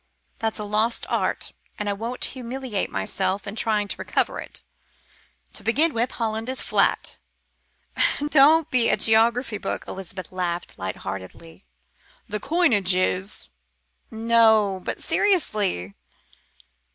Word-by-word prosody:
That's 225 -1 -1
a 210 - -3
lost 215 +3 0
art, - - -1 0.2
and 210 - -3
I 205 - +1
won't 230 +5 -3
humiliate 255 -4 -3
myself 190 - -1
in 200 - -6
trying 215 -2 +1
to - - -3
recover - - -1
it. - - -8 0.9
To - - -7
begin 300 +8 +2
with, 235 +3 0
Holland 225 0 -2
is 260 - -3
flat." - - +1 1.0
"Don't 295 +2 +5
be 245 -2 +4
a - - +3
geography 225 0 +3
book," - - -4
Elizabeth 185 -2 -7
laughed 175 -1 -3
light 95 0 -3
heartedly. 95 -4 -8 0.6
"The 210 - -3
coinage 230 - +3
is 185 +2 -1 0.3
" 60 0 -48
"No, 220 -4 +3
but - - -3
seriously." 210 - +1
215 Hz, 125 wpm, -24 LUFS, 185-240 Hz, 1.0 s, Don't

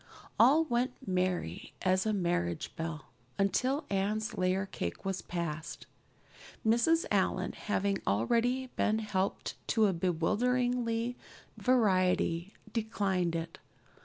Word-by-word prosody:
All 285 +7 +7
went 250 -3 0
merry 180 - -1
as 185 +2 +2
a - - +2
marriage 175 -4 -1
bell 160 -3 -5 0.3
until 255 +9 +1
Anne's 210 +3 0
layer 185 +1 +1
cake 85 - -5
was 190 -1 -2
passed. 170 -2 -4 0.8
Mrs. 240 +10 +3
Allan, - - +1
having 200 -2 -1
already 235 - +2
been 215 0 +2
helped 200 -3 -2
to 220 -1 +3
a 195 - +2
bewildering 230 +7 +1 0.5
variety, 185 -6 +2 0.2
declined 195 -6 0
it. 165 0 -4
195 Hz, 105 wpm, -31 LUFS, 175-230 Hz, 0.8 s, All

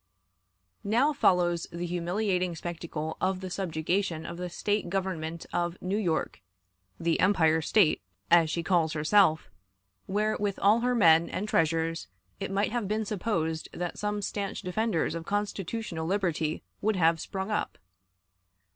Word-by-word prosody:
Now 245 +9 +2
follows 175 - +2
the 170 +1 -4
humiliating 180 +1 -1
spectacle 160 -2 -5
of 185 0 +1
the 185 -1 -6
subjugation 175 -1 -1
of 170 - -6
the 180 0 -4
State 205 +1 -1
government 170 -4 -3
of 175 0 -1
New 195 +3 -1
York 175 -6 -1 0.6
the 165 0 +1
"Empire" 160 -4 +4
State, 160 - +3 0.3
as 170 -2 +6
she 170 +2 -2
calls 165 -3 +2
herself 160 +1 +3 0.6
where, 210 +2 +1
with 205 -2 -1
all 210 +3 +4
her 250 +1 +1
men 165 -6 +5
and 210 - -3
treasures, 165 -2 0 0.3
it 195 - -3
might 200 +2 0
have 235 -4 -1
been 215 +2 -1
supposed 175 -6 -2
that 175 -1 -4
some 210 0 -2
stanch 200 0 -3
defenders 185 -3 0
of 165 0 -4
constitutional 205 -4 -3
liberty 170 -5 -1 0.2
would 215 0 +1
have 165 -2 +3
sprung 190 +2 -4
up. 210 - -2
180 Hz, 145 wpm, -28 LUFS, 165-205 Hz, 0.6 s, as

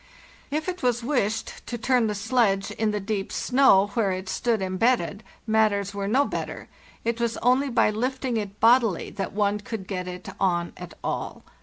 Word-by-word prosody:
If 310 +3 -2
it 365 0 -3
was 245 -1 +1
wished 230 -5 -1
to 240 - -3
turn 245 0 +2
the 210 - -2
sledge 200 -2 +1
in 220 -1 0
the 210 0 -1
deep 200 -1 -3
snow 205 -7 +4
where 215 -5 +1
it 185 0 -4
stood 235 +1 0
embedded, 195 +1 +1 0.2
matters 215 -3 +2
were 200 0 -3
no 265 +7 +3
better; - - -5 0.4
it 235 0 -1
was 235 -1 0
only 255 +3 +2
by 235 -3 +3
lifting 255 +3 -2
it 205 -2 -4
bodily 230 -5 +4
that 195 - -4
one 205 0 +1
could 210 -1 -6
get 185 -1 -4
it 180 0 -7
on 175 -2 +1
at - - -10
all. - - -4
220 Hz, 180 wpm, -25 LUFS, 195-245 Hz, 0.4 s, snow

